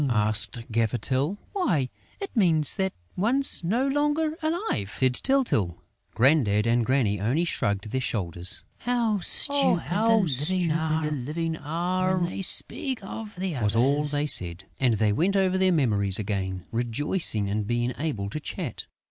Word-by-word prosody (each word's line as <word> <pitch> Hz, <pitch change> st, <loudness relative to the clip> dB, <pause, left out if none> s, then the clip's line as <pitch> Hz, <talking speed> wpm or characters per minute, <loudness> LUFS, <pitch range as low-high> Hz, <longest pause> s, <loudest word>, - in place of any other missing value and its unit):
asked 110 Hz, +1 st, +1 dB
Gaffer 115 Hz, +1 st, 0 dB
Tyl. 140 Hz, +10 st, -1 dB, 0.2 s
"Why, 175 Hz, -, 0 dB, 0.3 s
it 395 Hz, -6 st, -7 dB
means 165 Hz, -, +4 dB
that 190 Hz, -1 st, 0 dB, 0.2 s
one's 245 Hz, +4 st, 0 dB
no 235 Hz, +10 st, 0 dB
longer 295 Hz, +3 st, 0 dB
alive!" 320 Hz, -, -2 dB
said 130 Hz, -1 st, +3 dB
Tyltyl. 125 Hz, -, 0 dB, 0.4 s
Grandad 115 Hz, -5 st, +3 dB
and 120 Hz, +1 st, +2 dB
Granny 115 Hz, -5 st, 0 dB
only 130 Hz, +11 st, 0 dB
shrugged 100 Hz, -, -2 dB
their 130 Hz, -, -1 dB
shoulders: 90 Hz, -6 st, -1 dB, 0.2 s
"How 235 Hz, -4 st, 0 dB
stupid 280 Hz, -, +2 dB
the 160 Hz, -, +1 dB
Living 155 Hz, +4 st, -3 dB
are, 180 Hz, +5 st, -1 dB
when 175 Hz, -1 st, -1 dB
they -, -, -5 dB
speak 250 Hz, +5 st, +1 dB
of 210 Hz, +2 st, -8 dB
the 180 Hz, -2 st, -4 dB
Others!" 120 Hz, -, -3 dB
was 105 Hz, +1 st, +2 dB
all 135 Hz, +5 st, +2 dB
they 145 Hz, 0 st, +6 dB
said. 90 Hz, -, +1 dB, 0.2 s
And 125 Hz, -4 st, +2 dB
they 105 Hz, -1 st, +1 dB
went 185 Hz, -, 0 dB
over 190 Hz, -1 st, +2 dB
their 190 Hz, 0 st, +3 dB
memories 105 Hz, -, +1 dB
again, 95 Hz, -4 st, -4 dB
rejoicing 120 Hz, -, +1 dB
in 105 Hz, +1 st, -2 dB
being 120 Hz, +2 st, -1 dB
able 145 Hz, -11 st, -3 dB
to 155 Hz, -, -4 dB
chat. 155 Hz, -2 st, -6 dB
150 Hz, 150 wpm, -25 LUFS, 115-190 Hz, 0.4 s, they